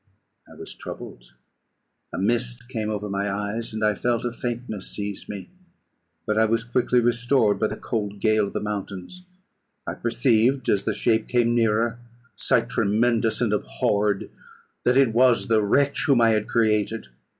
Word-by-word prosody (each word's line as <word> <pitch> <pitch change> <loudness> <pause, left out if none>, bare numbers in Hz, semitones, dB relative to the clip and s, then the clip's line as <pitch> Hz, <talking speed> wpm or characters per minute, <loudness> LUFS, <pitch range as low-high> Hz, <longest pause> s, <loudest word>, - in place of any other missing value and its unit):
I - - -13
was - - -9
troubled: - - -10 0.8
a - - -5
mist 120 +3 -1
came 110 -4 -3
over 105 -1 -3
my 100 0 -2
eyes, 105 +3 -3
and 110 0 -4
I 105 - +3
felt 120 +3 -1
a 120 - -1
faintness 120 -3 -5
seize 100 -1 -5
me; 100 - -7 0.7
but 110 -1 +1
I 110 - +5
was 115 +1 +1
quickly 125 +1 +1
restored 120 -1 +2
by 110 - +2
the - - -5
cold 105 -3 -4
gale 110 -1 +2
of - - -9
the - - -2
mountains. 105 - -6 0.6
I - - -3
perceived, 120 +2 +1
as 100 -1 +1
the - - 0
shape 110 -2 +1
came 120 -1 +2
nearer 115 0 +1 0.4
(sight 120 -3 +1
tremendous 115 0 +1
and 115 -3 +1
abhorred!) 105 -1 0 0.5
that 125 +1 +4
it 135 -5 +4
was 125 0 +3
the 110 -1 +4
wretch 140 +7 +1
whom 135 -4 +4
I 115 -1 +5
had 110 -1 0
created. 110 - 0
115 Hz, 165 wpm, -24 LUFS, 105-120 Hz, 0.8 s, I